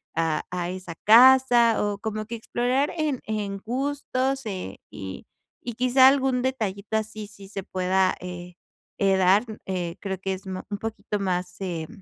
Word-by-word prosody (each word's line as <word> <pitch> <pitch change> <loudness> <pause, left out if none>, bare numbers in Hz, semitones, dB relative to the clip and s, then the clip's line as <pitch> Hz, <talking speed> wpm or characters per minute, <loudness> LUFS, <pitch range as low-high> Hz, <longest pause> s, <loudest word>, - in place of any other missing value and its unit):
a 160 -2 0
a 175 -1 -2
esa 185 -2 -7
casa, 240 0 +7
o 205 -1 -2
como 215 0 -4
que 235 - -5
explorar 245 +5 0
en 300 -5 0
en 205 -2 -3
gustos, 270 +2 -2
eh, 185 - -5
y 95 -1 -8 0.4
y 240 - -4
quizá 255 +2 +5
algún 265 -2 +1
detallito 220 -5 -2
así 215 -1 -5
sí 200 -2 -13
se 195 -1 -5
pueda, 185 0 +1
eh 180 0 -7 0.5
eh, 195 -1 +3
dar, 190 +3 +4 0.2
eh, 175 -3 -3
creo 190 -2 -4
que 190 0 -2
es 190 +1 -8
ma 185 -1 -5
un 205 - -3
poquito 220 -1 -4
más, 180 -2 -2
eh. 170 -4 -3
205 Hz, 165 wpm, -25 LUFS, 185-245 Hz, 0.5 s, casa